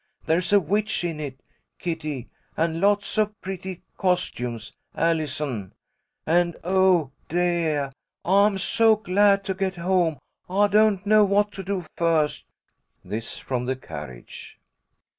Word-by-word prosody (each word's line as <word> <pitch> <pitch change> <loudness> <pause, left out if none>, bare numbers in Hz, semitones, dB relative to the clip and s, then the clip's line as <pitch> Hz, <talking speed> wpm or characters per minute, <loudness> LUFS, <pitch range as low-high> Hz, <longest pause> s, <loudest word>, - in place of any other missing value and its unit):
There's 175 +4 +1
a 205 - +7
witch 205 +4 -1
in 165 -3 -3
it, 135 -3 -7 0.3
Kitty, 155 -7 -4 0.3
and 165 +1 0
lots 205 +1 +2
of 210 -1 0
pretty 190 -1 -6
costumes, 125 - -1 0.2
Allison. 150 - -1 0.5
And, 170 +1 +2
oh, 185 -5 +3 0.2
deah, 165 -5 0 0.3
I'm 200 +2 +4
so 225 +4 +4
glad 200 0 +3
to 190 - -2
get 190 0 -2
home 175 -3 +1 0.3
I 205 +2 +3
don't 210 -1 +3
know 215 +1 +6
what 205 +1 +2
to 195 - -7
do 190 -2 -3
first!" 165 -3 +1 0.6
This 110 +2 -5
from 125 -2 -3
the 130 +1 -1
carriage. 75 - -10
175 Hz, 125 wpm, -24 LUFS, 150-200 Hz, 0.6 s, a